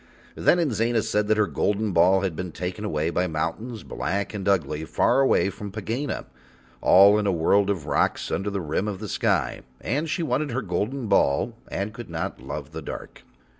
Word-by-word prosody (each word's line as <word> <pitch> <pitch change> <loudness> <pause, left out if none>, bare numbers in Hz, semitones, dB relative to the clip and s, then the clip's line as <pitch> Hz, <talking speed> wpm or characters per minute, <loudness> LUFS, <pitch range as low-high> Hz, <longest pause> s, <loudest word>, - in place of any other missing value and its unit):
Then - - +3
Inzana 120 -8 +1
said 105 0 0
that 110 0 +3
her 105 - +4
golden 105 +1 0
ball 90 +2 +4
had 95 -5 -2
been 90 +1 -4
taken 90 +5 -5
away 80 -7 -1
and - - -7
hidden 90 -1 +1
by 75 - -1
mountains 110 +8 -3
black 100 +2 -3
and 100 -2 -4
ugly, 80 -5 0
far 80 - +2
away 130 -7 +3
from 100 +1 -8
Pegāna, 115 +7 -3 0.6
all 100 +3 +7
in 105 - 0
a - - +3
world 95 +4 +3
of 90 -7 -1
rocks - - 0
under 100 +1 -1
the 100 -1 -3
rim 85 +6 -1
of 100 -2 -3
the 105 - -5
sky, - - 0 0.2
and 150 +7 -2
she 170 - -1
wanted 155 -1 0
her 130 +1 -2
golden 110 +8 -2
ball 70 -9 +2
and 100 +2 -3
could 120 -3 -9
not 80 -1 -4
love - - -6
the - - -6
dark. - - -8
100 Hz, 205 wpm, -25 LUFS, 90-110 Hz, 0.6 s, all